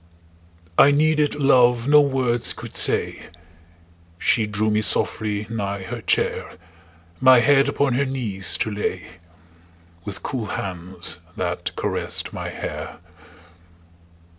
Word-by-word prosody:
I 140 - +8
needed 150 +1 +2
love 125 -4 +3
no 150 +1 +7
words 130 -4 0
could - - -10
say; - - 0 0.9
She 110 +4 +1
drew 105 +1 0
me 105 0 +2
softly 105 0 +1
nigh 100 -3 -4
her 95 - -6
chair, - - -1 0.7
My 130 -1 +7
head 140 +3 +4
upon 140 -3 0
her 140 +3 +1
knees 115 -8 -1
to 110 - -1
lay, 100 -3 -3 1.0
With 100 +1 -8
cool 125 -7 -4
hands 90 -2 -4 0.2
that - - -3
caressed - - -3
my - - -5
hair. - - -6
120 Hz, 115 wpm, -22 LUFS, 105-135 Hz, 1.0 s, I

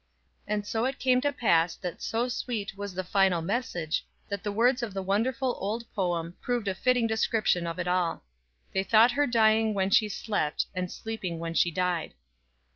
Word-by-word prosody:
And 210 0 -1
so 225 +3 -1
it 270 +1 -2
came 255 0 +3
to 285 +1 +1
pass 170 -10 +2
that 180 -2 -6
so 230 +2 -1
sweet 230 -5 -3
was 200 -2 -6
the 185 - -2
final 190 -1 +2
message 175 -7 -2 0.3
that 200 -3 -4
the 205 - -2
words 245 +5 +3
of 220 -5 -4
the 195 - -2
wonderful 235 +6 0
old 215 +4 -2
poem 175 -4 -1
proved 240 -4 -1
a 195 - +1
Siting 245 +4 +2
description 220 -5 +1
of 165 - -4
it 180 -1 -3
all. 180 - 0 0.5
"They 190 - +2
thought 225 +4 +5
her 290 +3 +1
dying 220 -2 +3
when 190 0 0
she 215 +1 +4
slept, 205 -7 -1
And 180 -1 -3
sleeping 215 -7 -5
when 165 0 -4
she 170 - +3
died." 180 -1 -1
205 Hz, 190 wpm, -28 LUFS, 180-230 Hz, 0.5 s, thought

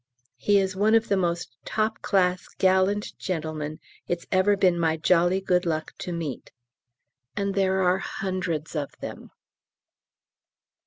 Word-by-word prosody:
He 205 -1 +3
is 190 -1 +1
one 210 +3 +3
of 225 0 +2
the 200 - +3
most 170 -8 -1
top 220 0 -1
class 180 -2 +1
gallant 190 +2 +2
gentlemen 155 -4 -3 0.3
it's 175 -1 -2
ever 195 +2 +3
been 180 -3 +3
my 160 -1 +1
jolly 175 +3 +3
good 180 -2 +1
luck 160 -3 -2
to 180 - -4
meet. 165 -6 -5 0.8
And 200 -1 -1
there 190 -1 +2
are 180 +1 +3
hundreds 180 -6 -3
of 145 -2 -2
them. - - -8
185 Hz, 140 wpm, -26 LUFS, 170-195 Hz, 0.8 s, He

